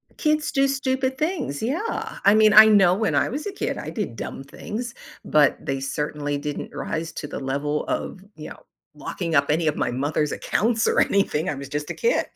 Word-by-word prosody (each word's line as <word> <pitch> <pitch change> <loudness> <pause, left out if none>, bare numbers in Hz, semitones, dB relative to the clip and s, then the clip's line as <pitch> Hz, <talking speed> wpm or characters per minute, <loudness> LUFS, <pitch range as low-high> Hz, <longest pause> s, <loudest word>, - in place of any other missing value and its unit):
Kids 305 -1 0
do 275 0 +3
stupid 265 -1 -1
things, 305 - -2
yeah, 325 - -3
I 200 - +6
mean, 215 -1 +5
I 215 +2 +11
know 195 -4 +5
when 220 +2 0
I - - +2
was 290 +4 -5
a 410 - -3
kid, 395 - -3
I - - -6
did - - -4
dumb - - -6
things, 235 +3 -6 0.3
but 150 -2 +3
they 135 -1 -3
certainly 145 +1 -3
didn't 145 0 -5
rise 165 0 -4
to 145 - -6
the - - -6
level 140 +2 -2
of, 185 - -4
you 155 - -9
know, - - -12 0.3
locking 165 +2 -4
up 140 +1 +3
any 160 +1 +1
of 150 - +1
my - - -1
mother's 145 +3 -1
accounts 225 +1 0
or - - +2
anything 185 -4 +1
I 150 - -2
was 140 0 -7
just 150 +1 -4
a - - -2
kid, 475 +1 +1
180 Hz, 210 wpm, -23 LUFS, -, 0.3 s, I